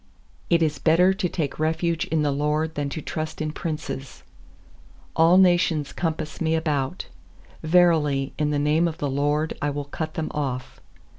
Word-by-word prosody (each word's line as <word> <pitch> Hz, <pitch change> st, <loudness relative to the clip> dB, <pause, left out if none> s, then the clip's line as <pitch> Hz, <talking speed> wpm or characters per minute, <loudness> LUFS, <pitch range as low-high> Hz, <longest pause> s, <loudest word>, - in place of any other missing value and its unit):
9It 170 Hz, -1 st, +4 dB
is 150 Hz, -3 st, -1 dB
better 180 Hz, +4 st, +4 dB
to 190 Hz, -2 st, -2 dB
take 150 Hz, -6 st, -3 dB
refuge 160 Hz, +1 st, 0 dB
in 160 Hz, -2 st, 0 dB
the 145 Hz, -, +1 dB
LORD 150 Hz, +3 st, 0 dB
Than 145 Hz, -1 st, -2 dB
to 155 Hz, +2 st, -6 dB
trust 155 Hz, 0 st, -4 dB
in 155 Hz, -1 st, -2 dB
princes. 140 Hz, -6 st, -5 dB, 0.9 s
10A11 170 Hz, +3 st, +6 dB
nations 175 Hz, -5 st, +2 dB
compass 160 Hz, -2 st, -3 dB
me 160 Hz, 0 st, +2 dB
about, 155 Hz, 0 st, -1 dB, 0.6 s
Verily, 155 Hz, -5 st, +3 dB
in 150 Hz, -1 st, +1 dB
the 150 Hz, -, 0 dB
name 150 Hz, +4 st, +2 dB
of 165 Hz, -, -4 dB
the 145 Hz, -, -2 dB
LORD 145 Hz, +3 st, 0 dB
I 145 Hz, -, +1 dB
will 145 Hz, 0 st, -4 dB
cut 155 Hz, +2 st, -5 dB
them 160 Hz, -1 st, -2 dB
off. 135 Hz, -4 st, -4 dB
155 Hz, 165 wpm, -24 LUFS, 145-165 Hz, 0.9 s, 10A11